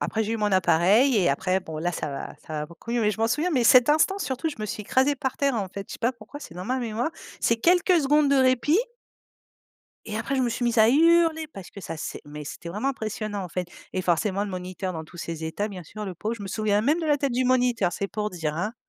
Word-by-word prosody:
après 220 - -1
j'ai 220 +1 -2
eu - - 0
mon 210 -2 0
appareil 190 +8 +4
et 185 -3 +3
après, 185 +7 +1
bon, 160 -3 -7
là, 175 +2 0
ça 155 -2 -4
va 140 - -6
ça 155 - -8
va 150 0 -3
beaucoup 170 +8 -11
mieux 240 - +1
mais 210 -1 +3
je 210 - -5
m'en 225 - +2
souviens 300 +9 0
mais 250 -4 +2
cet 250 +3 +7
instant 315 +6 +3
surtout, 295 -3 -2
je 290 - -9
me 215 - -2
suis 210 - -5
écrasée 265 +7 +2
par 265 0 -3
terre, 280 -2 +2
en 200 -4 -2
fait, 195 +2 -7
je - - -8
sais - - -10
pas 235 +3 +1
pourquoi 235 +5 -11
c'est 165 - -11
dans 180 +1 -6
ma 260 +1 0
mémoire. 235 +5 -2 0.3
C'est 230 - +2
quelques 355 +6 +4
secondes 290 +1 +3
de 280 - +4
répit 260 - +3 1.3
et 215 -1 -4
après 270 +5 -2
je 260 - +2
me 245 - +1
suis 235 +1 -2
mise 235 -1 +1
à 220 +1 +7
hurler 325 +1 +4
parce 190 -3 -10
que 200 - -10
ça 165 - -6
sai 155 - -6
mais 150 0 -8
c'était 170 - -8
vraiment 210 +10 -2
impressionnant, 215 -5 -3
en - - -7
fait, 180 0 -3 0.3
et 185 - -2
forcément 190 +4 +1
le 205 - -5
moniteur 185 0 -4
dans 160 -1 -6
tous 175 - -15
ses 165 -1 -5
états, 190 +6 -2
bien 190 -4 -8
sûr, 210 +6 -8
le 190 -3 -5
pauvre, 215 +6 -3
je 210 - -9
me 195 - -6
souviens 210 0 +1
même 300 +8 +2
de 320 - -2
la 295 -1 +3
tête 275 -2 0
du 255 +1 +1
moniteur 245 -7 +2
c'est 200 +4 -3
pour 210 0 -3
dire, 160 -4 -3
hein. 210 +6 -2
215 Hz, 275 wpm, -25 LUFS, 185-260 Hz, 1.3 s, cet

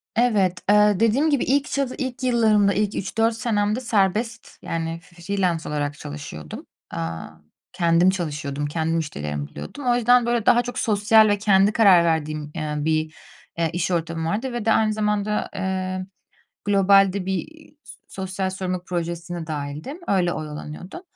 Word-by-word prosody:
Evet, 205 -7 +2
eee, 210 -1 +5
dediğim 235 +8 +3
gibi, 285 -4 +2
ilk 280 +2 +2
çal 275 -2 -1
ilk 260 -1 -4
yıllarımda, 220 -5 +3
ilk 205 +2 -1
3-4 225 +4 0
senemde 215 -1 0
serbest, 225 +1 0
yani, 165 0 -3
f 175 - -21
freelance 180 -3 -1
olarak 145 -1 -2
çalışıyordum. 75 - -8 0.3
Aaa, 80 0 -5 0.4
kendim 170 0 +3
çalışıyordum, 150 -6 -3
kendi 160 +2 -1
müşterilerimi 75 - -3
buluyordum. 280 - -9
O 245 -1 +3
yüzden, 245 0 +4
böyle, 235 -2 0
daha 240 - +5
çok 245 0 -5
sosyal 215 +1 +4
ve 205 0 +2
kendi 200 0 +4
karar 190 -7 +6
verdiğim, 155 -2 -1
eee, 150 -1 -3
bir, 155 +1 0 0.4
eee, 165 -1 +1
iş 175 +1 -1
ortamı 165 -1 -2
vardı 240 +8 -2
ve 240 -3 -4
de 225 - +3
aynı 215 -1 +3
zamanda, 210 0 -1
eee, 185 0 -2 0.6
globalde 195 -1 +4
bir, 190 0 0
iii, 310 -1 -19 0.3
sosyal 190 0 -3
sorumluluk 185 -1 -4
projesine 170 -1 -4
dâhildim, 150 - -5
öyle 180 -3 +2
oyalanıyordum. 155 - -7
190 Hz, 150 wpm, -23 LUFS, 165-220 Hz, 0.6 s, karar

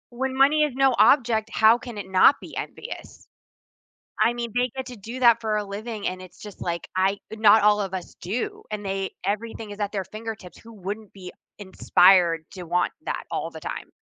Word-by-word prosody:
When 265 +1 -2
money 290 +3 +5
is 285 -4 -1
no 270 -1 +4
object, 225 -5 +4
how 220 +2 +5
can 240 -4 -9
it 200 - -6
not 190 +9 +6
be - - -11
envious? - - -8 0.9
I 230 +2 +5
mean, 235 -2 -5
they 250 0 +1
get 265 -1 -5
to 250 -1 -9
do 230 +5 -8
that 235 -2 +5
for 215 -1 0
a 210 - -1
living, 210 +1 -5
and 185 0 -4
it's 185 - -14
just 210 -2 -11
like 170 -1 -3
I 190 +2 +2 0.2
not 215 -1 +5
all 210 0 +4
of 190 -1 -4
us 180 -2 -6
do, 405 - -4
and 205 -1 -5
they 195 0 -2 0.2
everything 215 +1 -3
is 205 - -9
at 205 - -1
their 195 -3 -3
fingertips. 215 -4 -8
Who 230 - -14
wouldn't 205 +1 -7
be 185 -2 -11 0.3
inspired 180 -4 +4
to 185 -2 -8
want 175 +1 0
that - - -3
all - - -3
the - - -9
time? - - -6
210 Hz, 205 wpm, -24 LUFS, 190-235 Hz, 0.9 s, not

